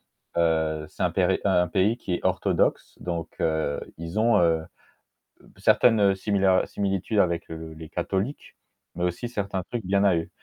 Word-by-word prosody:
heu, 80 Hz, -2 st, 0 dB
c'est -, -, -6 dB
un 90 Hz, -, +2 dB
péri 95 Hz, +1 st, +2 dB
un 90 Hz, -3 st, +3 dB
pays 100 Hz, +6 st, +2 dB
qui 90 Hz, -7 st, -3 dB
est -, -, -2 dB
orthodoxe, -, -, 0 dB
donc 85 Hz, -2 st, -3 dB
heu, 80 Hz, -3 st, 0 dB, 0.2 s
ils 85 Hz, +5 st, -5 dB
ont, 110 Hz, -1 st, +4 dB
heu, 80 Hz, -2 st, +3 dB, 0.8 s
une -, -, -20 dB
certaine 105 Hz, -5 st, +4 dB
similar 95 Hz, -1 st, +2 dB
similitude 100 Hz, +1 st, -1 dB
avec 85 Hz, -2 st, 0 dB
le 80 Hz, -1 st, -8 dB
les 80 Hz, 0 st, -10 dB
catholiques, 95 Hz, -, -3 dB, 0.4 s
mais 90 Hz, -, -1 dB
aussi 90 Hz, +7 st, -2 dB
certains 100 Hz, -5 st, -3 dB
trucs 120 Hz, -2 st, -3 dB
bien 100 Hz, +1 st, +2 dB
à 95 Hz, -3 st, +4 dB
eux. 80 Hz, -, -2 dB
90 Hz, 165 wpm, -25 LUFS, 85-100 Hz, 0.8 s, ont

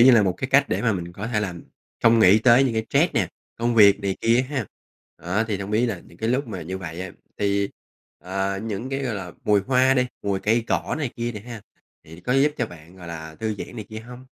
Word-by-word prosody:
như 125 Hz, +3 st, +9 dB
là 115 Hz, -4 st, +6 dB
một 95 Hz, -3 st, +1 dB
cái 130 Hz, -, -4 dB
cách 140 Hz, 0 st, +5 dB
để -, -, -1 dB
mà 115 Hz, -3 st, +3 dB
mình 85 Hz, -2 st, -5 dB
có 100 Hz, +4 st, -5 dB
thể 110 Hz, -3 st, 0 dB
làm 90 Hz, -5 st, -5 dB, 0.4 s
không 115 Hz, 0 st, +6 dB
nghĩ 105 Hz, -1 st, +7 dB
tới 125 Hz, +3 st, +6 dB
những 125 Hz, -, +1 dB
cái 110 Hz, 0 st, -1 dB
stress -, -, +2 dB
nè, -, -, +1 dB, 0.3 s
công 120 Hz, +1 st, 0 dB
việc 105 Hz, -2 st, +7 dB
này 100 Hz, -1 st, -1 dB
kia 115 Hz, +2 st, +3 dB
ha. 135 Hz, -7 st, -2 dB, 0.5 s
Đó, 95 Hz, +6 st, -1 dB
thì 100 Hz, -, -1 dB
hông 100 Hz, +1 st, -5 dB
biết 115 Hz, +3 st, +2 dB
là 105 Hz, -7 st, -2 dB
những 85 Hz, -, -18 dB
cái 110 Hz, -, -1 dB
lúc 130 Hz, +4 st, +1 dB
mà 95 Hz, -5 st, -5 dB
như 95 Hz, +4 st, -5 dB
vậy 85 Hz, -2 st, -6 dB
á 95 Hz, 0 st, -5 dB, 0.3 s
thì, 100 Hz, 0 st, +1 dB, 0.5 s
à, 95 Hz, +1 st, -2 dB
những 110 Hz, +3 st, -4 dB
cái, 135 Hz, 0 st, -2 dB
gọi 125 Hz, -4 st, -2 dB
là, 95 Hz, -3 st, -6 dB
mùi 105 Hz, -1 st, +4 dB
hoa 130 Hz, +5 st, +3 dB
đi, 125 Hz, -1 st, +2 dB, 0.2 s
mùi 100 Hz, -1 st, -1 dB
cây 115 Hz, +2 st, +2 dB
cỏ -, -, -1 dB
này 145 Hz, -5 st, -2 dB
kia 120 Hz, 0 st, -2 dB
đi 105 Hz, -, -7 dB
ha, 115 Hz, 0 st, -9 dB, 0.4 s
thì 80 Hz, +2 st, -12 dB
có 125 Hz, -, -1 dB
giúp 140 Hz, +3 st, +4 dB
cho 120 Hz, -, 0 dB
bạn, 85 Hz, -1 st, -14 dB
gọi 90 Hz, -2 st, -10 dB
là, 80 Hz, -1 st, -7 dB
thư 110 Hz, -1 st, -1 dB
giãn 125 Hz, -, -7 dB
này 110 Hz, -, -5 dB
kia 110 Hz, 0 st, -6 dB
hông? 125 Hz, +2 st, -11 dB
110 Hz, 265 wpm, -24 LUFS, 95-120 Hz, 0.5 s, như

